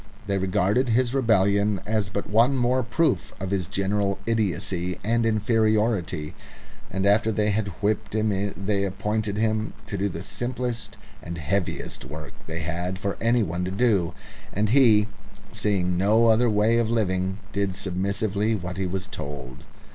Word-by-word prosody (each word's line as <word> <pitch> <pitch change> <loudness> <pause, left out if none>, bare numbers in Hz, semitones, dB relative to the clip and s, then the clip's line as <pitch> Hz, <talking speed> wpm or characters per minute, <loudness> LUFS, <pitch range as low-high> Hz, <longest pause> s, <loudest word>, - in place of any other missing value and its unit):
They 100 -1 0
regarded 95 +7 +1
his 120 +2 +2
rebellion 100 -5 +3
as 105 -2 0
but 100 0 -3
one 120 +6 +3
more 125 +1 +2
proof 120 - 0
of 95 0 -4
his 95 -4 0
general 100 +1 0
idiocy 95 -5 -1
and 115 +2 +2
inferiority; 110 -7 +1 0.6
and 95 0 -1
after 105 +2 +4
they 105 0 +1
had 105 0 0 0.2
whipped 105 0 0
him 100 -2 0
they 100 0 0
appointed 105 +2 -2
him 110 0 0
to 100 -2 -4
do 100 +1 +1
the 85 0 -6
simplest 120 -1 -3 0.2
and 85 +1 -6
heaviest 85 +5 -2
work 75 +2 -8
they 80 +1 -4
had 90 +3 -3
for 100 +1 -2
anyone 110 -7 +1
to 90 - -2
do, 95 -5 +1 0.4
and 105 +2 0
he, 115 -5 +6 0.5
seeing 90 -4 0
no 110 +4 +4
other 115 +2 +4
way 110 +2 +3
of 115 -2 +1
living, 95 -4 0 0.2
did 100 -2 -1
submissively 100 +3 0
what 90 -2 -5
he 95 -1 -1
was 95 +1 -3
told. 70 -2 -7
100 Hz, 155 wpm, -25 LUFS, 95-110 Hz, 0.6 s, he